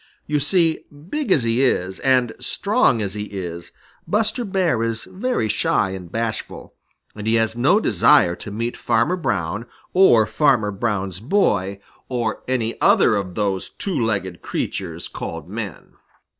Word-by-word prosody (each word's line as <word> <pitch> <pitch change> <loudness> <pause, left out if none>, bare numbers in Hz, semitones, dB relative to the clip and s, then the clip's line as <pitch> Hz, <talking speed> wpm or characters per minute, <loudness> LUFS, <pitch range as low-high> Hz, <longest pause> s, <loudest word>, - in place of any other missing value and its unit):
You 150 0 0
see, 165 +2 +2
big 190 - -4
as 140 - +4
he 115 +2 +1
is 95 -7 0
and 125 -3 +2
strong 110 - +1
as 95 -1 -3
he 105 0 -4
is, 90 -4 -6 0.4
Buster 215 +6 0
Bear 185 - +1
is 115 -1 -2
very 220 - -2
shy 105 -1 +1
and 90 -3 -8
bashful, 115 0 -4 0.4
and 105 0 -6
he 110 - +3
has 110 0 +1
no 140 - +4
desire 90 - +4
to - - -8
meet 115 +4 -3
Farmer 115 +9 +1
Brown, 105 - -2 0.3
or 120 - +6
Farmer 125 -6 +2
Brown's 100 -3 -2
boy, 100 - +1 0.3
or 120 -4 -2
any 120 -3 -1
other - - +5
of 95 -3 -3
those 100 -3 -1
two 195 -3 -4
legged 95 -5 -2
creatures 85 -3 -4
called - - -6
men. - - -7
115 Hz, 150 wpm, -21 LUFS, 100-145 Hz, 0.4 s, or